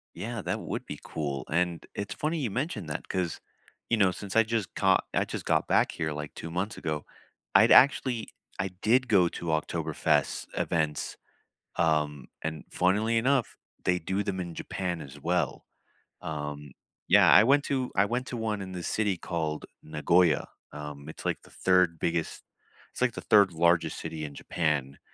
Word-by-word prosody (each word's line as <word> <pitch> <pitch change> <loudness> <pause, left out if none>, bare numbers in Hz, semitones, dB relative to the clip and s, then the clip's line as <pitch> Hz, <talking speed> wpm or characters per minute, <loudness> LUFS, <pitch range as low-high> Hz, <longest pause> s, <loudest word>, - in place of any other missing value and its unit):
Yeah, 115 0 -4
that - - -2
would - - -5
be - - -6
cool. 70 -4 -4
And, 85 +1 0
it's 100 -1 -4
funny 155 +7 -1
you 120 - -1
mentioned 115 - -3
that, 75 - -4
'cause, 90 -3 -2 0.5
you 115 - +3
know, 95 -4 +4
since 100 +1 -7
I 115 - +8
just 115 -2 -2
caught - - +3
I - - +2
just - - -6
got - - +1
back - - +3
here, 80 -1 -2
like, 75 0 -6
2 80 - -7
months 90 +5 -2
ago, 75 -2 -3 0.5
I'd - - +7
actually 130 -4 +5 0.3
I 95 - 0
did 110 +8 +1
go 95 -6 +5
to 85 - -7
Oktoberfest 80 0 0
events, 80 -3 -1 0.6
um, 75 -4 +1
and 80 0 -4
funnily 105 +5 +2
enough, 130 0 +1 0.3
they 90 0 +2
do 95 +4 -1
them 100 -2 -3
in 85 -2 -5
Japan, 90 -1 -3
as 70 -1 -10
well. 85 -2 -1 0.6
Um, 75 -2 -5 0.4
yeah, - - +7
I 105 - +9
went 140 +3 +4
to 130 -2 -1
I 100 - +5
went 125 +4 -2
to 125 - -4
1 110 -3 -2
in 95 -1 -6
the 90 -1 -5
city 105 -2 0
called 80 -3 -3 0.2
Nagoya, 80 +2 +2 0.2
um, 75 -1 -8
it's - - -10
like - - -1
the - - -17
3rd 90 -3 +2
biggest 85 -1 -2 0.5
it's - - -9
like 125 -2 +2
the - - -6
3rd 100 -4 +5
largest 85 +1 +2
city 80 -1 -5
in 70 -1 -8
Japan, 75 -5 -1
90 Hz, 175 wpm, -28 LUFS, 80-105 Hz, 0.6 s, I